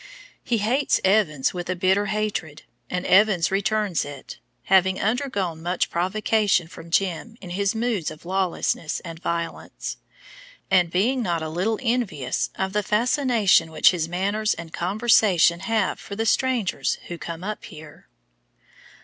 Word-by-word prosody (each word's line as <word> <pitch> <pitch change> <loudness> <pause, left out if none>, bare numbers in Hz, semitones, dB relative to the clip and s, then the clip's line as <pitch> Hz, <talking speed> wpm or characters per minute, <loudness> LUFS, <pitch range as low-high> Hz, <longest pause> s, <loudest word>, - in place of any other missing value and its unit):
He 240 - 0
hates 245 +7 +1
Evans 185 -9 +2
with 175 -1 -5
a 185 - 0
bitter 190 +3 +2
hatred, 200 -7 -3 0.3
and 180 0 -3
Evans 190 -3 +4
returns 200 -2 0
it, 145 -1 -9 0.2
having 190 0 +3
undergone 205 - -1
much 175 +2 -1
provocation 195 0 +1
from 170 0 -12
Jim 195 +5 -1
in 180 -3 -9
his 200 +3 0
moods 225 -7 -1
of 155 +1 -12
lawlessness 185 -4 -1
and 165 -2 -9
violence, 170 -1 -4 0.7
and 180 -3 +4
being 230 +10 +1
not 170 -6 -1
a 160 - -4
little 190 +7 -1
envious 225 - -1
of 190 0 -2
the 210 - +1
fascination 220 - +2
which 160 - +5
his 165 -3 -2
manners 200 +4 0
and 165 -1 -9
conversation 190 -3 +3
have 205 +1 0
for 200 - -8
the 225 +2 -1
strangers 245 -3 +1
who 175 -1 -7
come 170 +1 -6
up 210 +2 -5
here. 155 -1 -13
190 Hz, 145 wpm, -24 LUFS, 170-215 Hz, 0.7 s, which